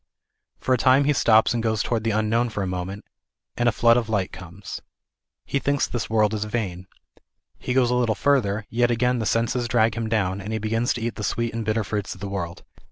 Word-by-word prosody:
For 130 Hz, -, +1 dB
a 125 Hz, -, +2 dB
time 130 Hz, +3 st, +5 dB
he 145 Hz, +1 st, +2 dB
stops 110 Hz, -5 st, +4 dB
and 120 Hz, -, -1 dB
goes 110 Hz, -2 st, 0 dB
toward 115 Hz, -3 st, -1 dB
the 115 Hz, -, 0 dB
unknown 110 Hz, +3 st, +1 dB
for 105 Hz, -3 st, -3 dB
a -, -, -1 dB
moment, 90 Hz, +2 st, -5 dB, 0.5 s
and 120 Hz, 0 st, +2 dB
a -, -, +1 dB
flood 115 Hz, +2 st, +4 dB
of 115 Hz, -2 st, -1 dB
light 100 Hz, -4 st, 0 dB
comes. 90 Hz, +2 st, -9 dB, 0.6 s
He 140 Hz, -, -1 dB
thinks 140 Hz, 0 st, +1 dB
this 120 Hz, -, -4 dB
world 110 Hz, -1 st, +2 dB
is 105 Hz, -1 st, -1 dB
vain. 95 Hz, -5 st, -4 dB, 0.7 s
He 125 Hz, -, -3 dB
goes 125 Hz, -2 st, +3 dB
a -, -, +2 dB
little 120 Hz, -3 st, +1 dB
further, 110 Hz, -7 st, +1 dB
yet 120 Hz, +1 st, +2 dB
again 125 Hz, +1 st, +1 dB
the 110 Hz, -, -1 dB
senses 120 Hz, +1 st, 0 dB
drag 115 Hz, -2 st, +2 dB
him 115 Hz, -1 st, -3 dB
down, 100 Hz, -3 st, 0 dB
and 105 Hz, +3 st, -6 dB
he -, -, 0 dB
begins 115 Hz, +3 st, 0 dB
to 120 Hz, -, -6 dB
eat 115 Hz, 0 st, -3 dB
the 105 Hz, -, -5 dB
sweet 115 Hz, +2 st, -1 dB
and 115 Hz, 0 st, -3 dB
bitter 110 Hz, +1 st, 0 dB
fruits 105 Hz, -1 st, -3 dB
of -, -, -15 dB
the 100 Hz, +1 st, -5 dB
world. 85 Hz, -3 st, -5 dB
110 Hz, 230 wpm, -24 LUFS, 105-120 Hz, 0.7 s, time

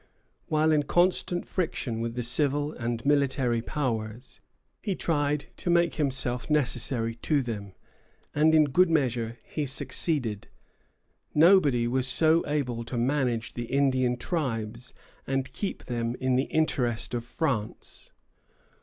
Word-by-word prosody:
While 155 Hz, 0 st, +2 dB
in 150 Hz, -1 st, +4 dB
constant 175 Hz, +3 st, +1 dB
friction 130 Hz, -10 st, -2 dB
with 115 Hz, 0 st, -3 dB
the 125 Hz, -, -2 dB
civil 145 Hz, +4 st, 0 dB
and 120 Hz, +1 st, -4 dB
military 135 Hz, -4 st, +2 dB
powers, 120 Hz, -3 st, -4 dB, 0.4 s
he 200 Hz, -3 st, -2 dB
tried 145 Hz, -3 st, 0 dB
to -, -, -3 dB
make 170 Hz, -1 st, +3 dB
himself 135 Hz, -4 st, -1 dB
necessary 125 Hz, -5 st, 0 dB
to 145 Hz, +3 st, +1 dB
them, 100 Hz, -5 st, -5 dB, 0.6 s
and 155 Hz, +2 st, +4 dB
in 155 Hz, -, +7 dB
good 165 Hz, +5 st, +3 dB
measure 120 Hz, -7 st, 0 dB
he 150 Hz, -2 st, -3 dB
succeeded. 130 Hz, -, -1 dB, 0.9 s
Nobody 150 Hz, -8 st, +5 dB
was 130 Hz, +1 st, 0 dB
so 160 Hz, +5 st, +3 dB
able 125 Hz, -6 st, -1 dB
to 120 Hz, -, -4 dB
manage 125 Hz, -2 st, 0 dB
the 120 Hz, -, -4 dB
Indian 130 Hz, -1 st, +1 dB
tribes 120 Hz, -7 st, -3 dB, 0.4 s
and 135 Hz, -1 st, -2 dB
keep 200 Hz, -, -4 dB
them 120 Hz, -1 st, -2 dB
in 130 Hz, -1 st, +1 dB
the 130 Hz, +2 st, +2 dB
interest 125 Hz, -9 st, 0 dB
of 120 Hz, -1 st, -2 dB
France. 120 Hz, -4 st, -4 dB
130 Hz, 130 wpm, -27 LUFS, 120-150 Hz, 0.9 s, in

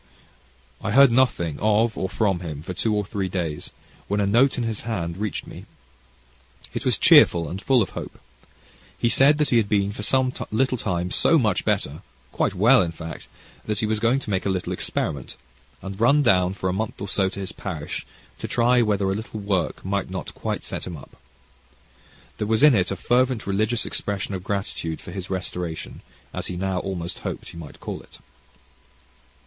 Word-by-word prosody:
I -, -, -2 dB
heard 140 Hz, -1 st, +7 dB
nothing 115 Hz, -, +2 dB
of 110 Hz, +2 st, +2 dB
or 95 Hz, -, -2 dB
from 100 Hz, -2 st, +1 dB
him 80 Hz, -4 st, -6 dB
for 90 Hz, -, -5 dB
two 105 Hz, +5 st, 0 dB
or 105 Hz, -1 st, 0 dB
three 95 Hz, -1 st, -3 dB
days, 85 Hz, -5 st, -3 dB, 0.4 s
when 105 Hz, -, 0 dB
a 100 Hz, -, +2 dB
note 120 Hz, +7 st, +3 dB
in 120 Hz, -, 0 dB
his 115 Hz, -2 st, -2 dB
hand 90 Hz, -8 st, -3 dB
reached 105 Hz, +1 st, -3 dB
me. -, -, -11 dB, 1.1 s
It -, -, -4 dB
was -, -, +2 dB
cheerful, 85 Hz, -2 st, +6 dB
and 95 Hz, +6 st, -5 dB
full 130 Hz, -2 st, +4 dB
of 95 Hz, -, -7 dB
hope. -, -, -7 dB, 0.8 s
He 120 Hz, -, +1 dB
said 140 Hz, +5 st, +5 dB
that 150 Hz, -2 st, +1 dB
he 120 Hz, -, +5 dB
had 110 Hz, -3 st, +2 dB
been 100 Hz, -1 st, +2 dB
for 105 Hz, -, -7 dB
some 130 Hz, +4 st, +2 dB, 0.2 s
little 130 Hz, +2 st, +1 dB
time 90 Hz, -3 st, -2 dB
so 165 Hz, -, +4 dB
much 105 Hz, -, +1 dB
better 95 Hz, -8 st, -1 dB, 0.3 s
quite -, -, 0 dB
well, 115 Hz, +7 st, +6 dB
in 85 Hz, -3 st, -1 dB
fact 80 Hz, 0 st, -8 dB, 0.4 s
that 105 Hz, -1 st, -1 dB
he 110 Hz, -, 0 dB
was 110 Hz, 0 st, 0 dB
going 115 Hz, +4 st, +3 dB
to 105 Hz, -, -5 dB
make 95 Hz, -1 st, 0 dB
a -, -, -1 dB
little 95 Hz, -2 st, -1 dB
experiment, 65 Hz, -4 st, -3 dB, 0.5 s
and 95 Hz, +2 st, -6 dB
run 140 Hz, +5 st, +5 dB
down 95 Hz, -5 st, +3 dB
for 95 Hz, -, -3 dB
a 90 Hz, -, 0 dB
month 110 Hz, +3 st, -3 dB
or 100 Hz, -, -4 dB
so 95 Hz, -1 st, +1 dB
to 100 Hz, -, -8 dB
his 95 Hz, -2 st, -5 dB
parish, 80 Hz, -7 st, -5 dB, 0.4 s
to -, -, -4 dB
try 120 Hz, +1 st, +3 dB
whether 105 Hz, -3 st, +1 dB
a -, -, +1 dB
little 110 Hz, +1 st, -5 dB
work 95 Hz, -6 st, -1 dB
might 100 Hz, 0 st, -1 dB
not 95 Hz, 0 st, -5 dB
quite -, -, -3 dB
set -, -, -5 dB
him 85 Hz, -3 st, -6 dB
up. 70 Hz, -, -14 dB, 1.2 s
There 105 Hz, -, -1 dB
was 110 Hz, +4 st, +2 dB
in 150 Hz, -2 st, +8 dB
it 95 Hz, -5 st, +2 dB
a 95 Hz, -, -2 dB
fervent 125 Hz, +3 st, +1 dB
religious 110 Hz, +4 st, 0 dB
expression 100 Hz, -1 st, -3 dB
of 90 Hz, -1 st, -4 dB
gratitude 95 Hz, -5 st, -3 dB
for -, -, -10 dB
his 95 Hz, -2 st, -6 dB
restoration, 90 Hz, -3 st, -4 dB, 0.3 s
as -, -, -3 dB
he 90 Hz, -, -4 dB
now 95 Hz, 0 st, -1 dB
almost 90 Hz, -3 st, -4 dB
hoped -, -, -5 dB
he -, -, -11 dB
might 80 Hz, -4 st, -10 dB
call -, -, -6 dB
it. -, -, -17 dB
100 Hz, 200 wpm, -24 LUFS, 90-115 Hz, 1.2 s, in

